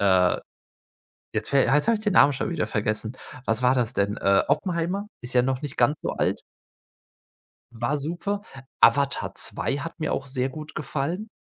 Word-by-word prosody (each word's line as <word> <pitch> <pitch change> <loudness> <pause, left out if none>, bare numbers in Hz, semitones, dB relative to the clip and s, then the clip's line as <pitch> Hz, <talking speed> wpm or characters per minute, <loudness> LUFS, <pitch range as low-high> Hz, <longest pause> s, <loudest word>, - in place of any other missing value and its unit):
äh, 95 -2 +4 1.0
jetzt 110 0 -2
ver 140 -1 +4
jetzt 150 - +3
habe 230 - +4
ich 210 - -8
den 205 - +2
Namen 140 +1 +7
schon 135 - -3
wieder 170 -3 -1
vergessen. 110 +2 -2 0.3
Was 115 +2 +1
war 125 +1 +4
das 125 -2 0
denn? 100 0 0
Äh, 100 -1 +3
Oppenheimer 175 +6 0 0.2
ist 125 +1 -2
ja 125 - +5
noch 130 +2 -1
nicht 145 -3 -5
ganz 125 +5 +2
so - - -1
alt. - - 0 1.3
War 120 +5 -1
super. 175 +7 -3 0.4
Avatar 140 +3 +3
2 135 - 0
hat 165 +2 -7
mir 155 - -1
auch 140 - -2
sehr 130 -1 -1
gut 155 +3 -9
gefallen 155 - -3
135 Hz, 180 wpm, -25 LUFS, 120-155 Hz, 1.3 s, Namen